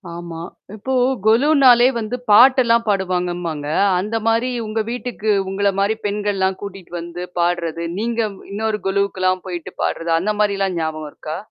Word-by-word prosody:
ஆமா! 170 -1 -7 0.3
இப்போ 260 +5 -4 0.3
கொலுன்னாலே 250 +1 +5
வந்து 225 +1 -3 0.2
பாட்டெல்லாம் 235 0 +6
பாடுவாங்கம்பாங்க, 180 -5 -1 0.3
அந்த 210 +4 -3
மாரி 230 +3 +2
உங்க 215 +1 -2
வீட்டுக்கு 240 -3 -2 0.2
உங்கள 200 +1 +1
மாரி 200 +2 +2
பெண்கள்லாம் 200 -2 -1
கூட்டிட்டு 195 -3 -9
வந்து 170 +1 -7 0.2
பாடுறது, 170 -1 -1
நீங்க 235 +1 -1 0.3
இன்னொரு 215 +1 -2
கொலுவுக்கெல்லாம் 190 -2 0
போயிட்டு 175 -2 -6
பாடுறது, 165 0 -2
அந்த 210 +5 -1
மாரிலாம் 195 -3 0
ஞாபகம் 155 -1 -3
இருக்கா? 155 +1 -6
200 Hz, 130 wpm, -20 LUFS, 175-220 Hz, 0.3 s, பாட்டெல்லாம்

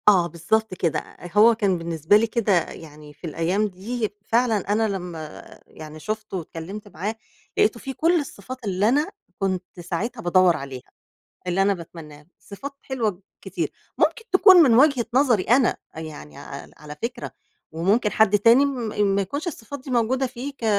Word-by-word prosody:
آه 185 -5 +6
بالضبط 220 +5 -1
كده، 170 -3 0
أ - - -14 0.3
أ - - +2
كان 200 -5 +1
بالنسبة 165 +3 +2
لي 225 +2 +1
كده 225 -2 0 0.2
يعني 150 -2 -12
في 170 - -9
الأيام 175 +7 0
دي، 215 +4 -4
فعلًا 230 0 +2 0.2
أنا 220 +1 +2
لمّا 175 -6 -6 0.2
يعني 155 0 -11
شُفته 215 +3 -4
واتكلمت 180 +5 -7
معاه، 205 +4 -4 0.4
لقيته 225 +2 +3
فيه 270 - -6
كُلّ 335 +5 +2
الصفات 255 -2 -8
اللي 195 +2 +1
أنا 295 +9 +1 0.3
كنت 185 -2 -3
ساعتها 195 +8 -4
بادوّر 180 -2 +4
عليها، 135 -2 -9 0.6
اللي 180 +2 +1
أنا 200 +1 +3
باتمناه، 155 -4 -11
صفات 270 +8 -8
حلوة 220 -8 -2 0.2
كتير، 180 -5 -3 0.3
ممكن 455 - +1
تكون 380 0 +8
من 295 -9 +7
وجهة 260 -1 +4
نظري 250 -7 +4
أنا، 245 +3 +3 0.2
يعني 155 - -9
عل - - -9
على 150 0 -10
فكرة 240 +1 -4 0.4
وممكن 195 +7 +1
حد 210 -1 +4
تاني 230 +7 +6
م 255 -5 -2 0.3
ما 200 - +2
يكونش 285 - -5
الصفات 285 -3 -6
دي 265 - -8
موجودة 250 +2 +1
فيه 260 +3 -6
ك 265 - -10
205 Hz, 165 wpm, -23 LUFS, 175-240 Hz, 0.6 s, تكون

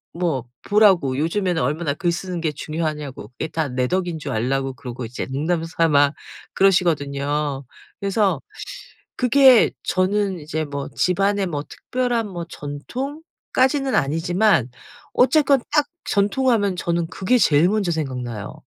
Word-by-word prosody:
뭐 160 -8 -1 0.2
보라고 190 -11 +4
요즘에는 175 +3 0
얼마나 145 +3 -1
글 175 +2 0
쓰는 180 +1 -4
게 160 -2 0
중요하냐고. 150 -5 -4
그게 125 - -5
다 160 -1 -2
내 125 0 0
덕인 175 -2 -1
줄 - - -5
알라고. 135 +4 -1
그러고 125 -1 -7
이제 115 +3 -5
농담 160 +5 -1
삼아 155 -3 +3 0.4
그러시거든요. 145 -6 +1 0.4
그래서 195 -5 +1 0.8
그게 255 0 +6
저는 190 0 0
이제 155 +1 -3
뭐 140 -1 -5
집안에 195 +2 +1
뭐 150 -4 -3
특별한 245 -3 -2
뭐 175 -3 -5
전통까지는 265 - -2
아니지만 165 - +2 0.4
어쨌건 280 +1 +4
딱 300 -1 +3 0.2
'전통' 205 +6 +1
하면 205 -4 +1
저는 170 -1 -1
그게 195 +8 +1
제일 150 -1 +4
먼저 205 -4 0
생각나요. 125 -9 -4
170 Hz, 295 characters per minute, -22 LUFS, 145-200 Hz, 0.8 s, 그게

